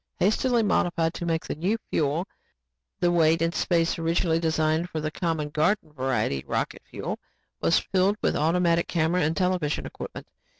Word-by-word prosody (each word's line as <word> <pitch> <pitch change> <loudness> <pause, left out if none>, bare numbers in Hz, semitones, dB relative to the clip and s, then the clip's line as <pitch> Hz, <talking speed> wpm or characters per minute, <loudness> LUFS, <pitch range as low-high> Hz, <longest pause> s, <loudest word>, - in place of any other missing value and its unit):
Hastily 235 +4 +2
modified 170 -5 +1
to 170 - -5
take 165 -1 0
the - - -3
new 185 +9 0
fuel, 155 +4 +1 0.7
the 175 - +3
weight 165 -1 +4
and 165 +1 0
space 170 -2 +1
originally 165 0 +1
designed 160 +1 +1
for 160 - -3
the 155 0 -2
common 160 -3 -2
garden 155 +2 0
variety 130 - 0
of - - -22
rocket - - -2
fuel - - -5 0.4
was 165 - +4
filled 195 +2 +1
with - - 0
automatic 170 +2 +2
camera 170 +2 +1
and 160 +1 0
television 180 -5 0
equipment. - - -8
165 Hz, 165 wpm, -26 LUFS, 155-180 Hz, 0.7 s, weight